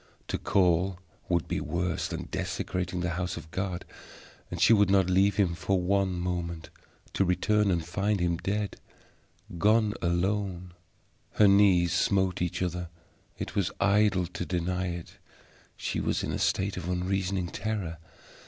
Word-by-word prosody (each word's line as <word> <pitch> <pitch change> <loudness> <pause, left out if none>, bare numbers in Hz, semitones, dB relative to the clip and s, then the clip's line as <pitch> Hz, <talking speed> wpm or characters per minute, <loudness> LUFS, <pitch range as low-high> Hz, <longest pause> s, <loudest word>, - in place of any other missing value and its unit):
To - - -1
call 90 0 +2 0.3
would 85 -2 +1
be - - -2
worse 85 0 -1
than - - -5
desecrating 90 -1 -2
the 90 0 -1
house 90 -1 -3
of 80 -1 -10
God, 95 -2 -3 0.6
and - - -5
she - - +6
would 100 -3 +4
not 95 -2 +3
leave 95 +1 +4
him 95 -4 +2
for 90 +3 0
one 95 +1 +1
moment. 85 -2 -3 0.4
To - - +2
return 100 +3 +2
and 85 -3 0
find 105 0 0
him 85 -1 +1
dead 100 +3 -2 0.8
gone 105 +2 +3
alone! 90 0 -1 0.6
Her 105 - +5
knees 95 -3 +5
smote 95 -3 +1
each 90 +1 -1
other. 90 -1 -3 0.5
It - - -5
was 95 -3 +1
idle 100 -3 +3
to 85 - -5
deny 90 +1 -1
it; 85 -1 -7 0.6
she - - -2
was - - -1
in - - -2
a - - -2
state 95 +1 0
of 85 - -4
unreasoning 90 0 -1
terror. 95 -7 -3
90 Hz, 155 wpm, -28 LUFS, 85-100 Hz, 0.8 s, she